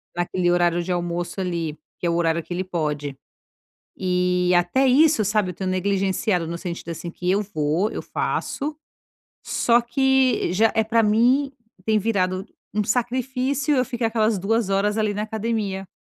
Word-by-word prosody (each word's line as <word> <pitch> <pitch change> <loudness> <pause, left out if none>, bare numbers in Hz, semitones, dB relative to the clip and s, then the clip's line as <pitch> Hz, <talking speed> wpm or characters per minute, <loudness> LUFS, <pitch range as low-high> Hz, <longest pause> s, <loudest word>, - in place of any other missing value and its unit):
Naquele 175 +1 0
horário 175 0 +2
de 170 - -7
almoço 175 +1 -2
ali, 170 -4 -3 0.2
que 175 - -1
é - - +2
o 170 - +1
horário 170 -1 +1
que 175 - -7
ele 180 +2 -2
pode. 150 -6 -3 0.8
E, 180 -1 +1
até 175 +10 +2
isso 290 -1 +5
sabe, 210 -2 +1
eu - - -8
tenho 190 +2 -3
negligenciado 190 0 0
no 170 +1 -4
sentido, 170 -1 -6
assim, 170 +1 -5
que 180 +1 -3
eu 200 +2 +2
vou, 170 +1 -1
eu - - -4
faço. 295 +2 -3 0.7
Só 235 0 +2
que 260 -2 +2
já 220 +5 +3
é 220 - +3
pra 225 +1 +2
mim, 240 +6 +3 0.4
tem 220 -1 +3
virado 190 -3 0 0.3
um 210 - +1
sacrifício, 255 +5 0
eu 255 -1 +2
ficar 240 -2 -1
aquelas 220 -1 +1
2 210 +2 0
horas, 200 +2 +1
ali 215 -1 +1
na 205 - -3
academia, 215 -3 -3
195 Hz, 170 wpm, -23 LUFS, 175-230 Hz, 0.8 s, isso